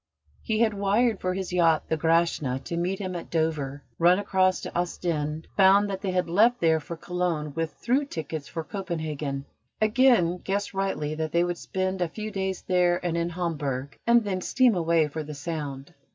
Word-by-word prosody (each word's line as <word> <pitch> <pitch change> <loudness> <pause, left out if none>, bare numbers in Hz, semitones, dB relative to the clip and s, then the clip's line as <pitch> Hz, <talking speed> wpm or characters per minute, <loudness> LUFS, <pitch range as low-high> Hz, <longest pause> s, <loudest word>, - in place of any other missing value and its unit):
He 220 0 -1
had 220 -2 +3
wired 205 +3 +1
for 185 0 -1
his 190 -1 -4
yacht, 165 -3 +3
the 160 - +1
Grashna, 160 -5 +1
to 170 - -4
meet 180 +3 -1
him 185 -2 -4
at 170 - -6
Dover, 150 -4 -1 0.2
run 175 +2 +5
across 185 -2 +2
to - - -7
Ostend, 160 -3 -2
found 200 +1 +5
that 190 -1 -4
they 200 - -2
had 180 -1 0
left 225 +8 +4
there 160 -1 +3
for 165 +2 -7
Cologne 170 -4 -2
with 165 -1 -2
through 265 +4 0
tickets 160 - -5
for 165 - -5
Copenhagen, 155 -6 -4 0.3
again 215 -6 +4
guessed 200 +2 -2
rightly 190 -6 -1
that 155 0 -3
they 170 0 +4
would 175 -1 -2
spend 185 0 -2
a 175 - +2
few 215 +5 -6
days 190 -2 -3
there 180 -1 +2
and 170 -1 0
in 170 0 0
Hamburg, 145 -6 -3
and 235 0 +5
then 190 -3 -2
steam 255 +2 +3
away 165 -3 +2
for 155 +2 -5
the 150 0 -7
Sound. 140 -1 -5
175 Hz, 190 wpm, -26 LUFS, 160-195 Hz, 0.3 s, run